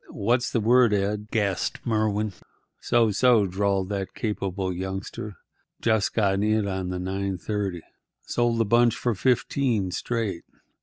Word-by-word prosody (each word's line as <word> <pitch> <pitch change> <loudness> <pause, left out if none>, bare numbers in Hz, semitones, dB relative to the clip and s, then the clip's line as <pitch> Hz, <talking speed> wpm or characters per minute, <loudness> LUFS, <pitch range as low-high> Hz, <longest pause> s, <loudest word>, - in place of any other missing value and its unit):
"What's 120 +4 0
the 115 - 0
word, 120 +1 +4
Ed?" 105 +1 -1
gasped 100 -5 -1
Merwin. 110 -2 0 0.5
"So, 115 -2 +2
so," 115 0 +4
drawled 95 0 0
that 100 -2 -4
capable 95 -3 -2
youngster. 95 +3 -5 0.4
"Just 110 -3 +1
got 100 -3 +2
in 110 0 +1
on 95 -2 -3
the 90 - -3
9:30. 95 0 -3 0.4
Sold 120 -1 0
the 115 - +2
bunch 120 +2 +4
for 120 - -1
fifteen, 120 -2 +1
straight. 110 -5 -2
105 Hz, 135 wpm, -25 LUFS, 95-115 Hz, 0.5 s, word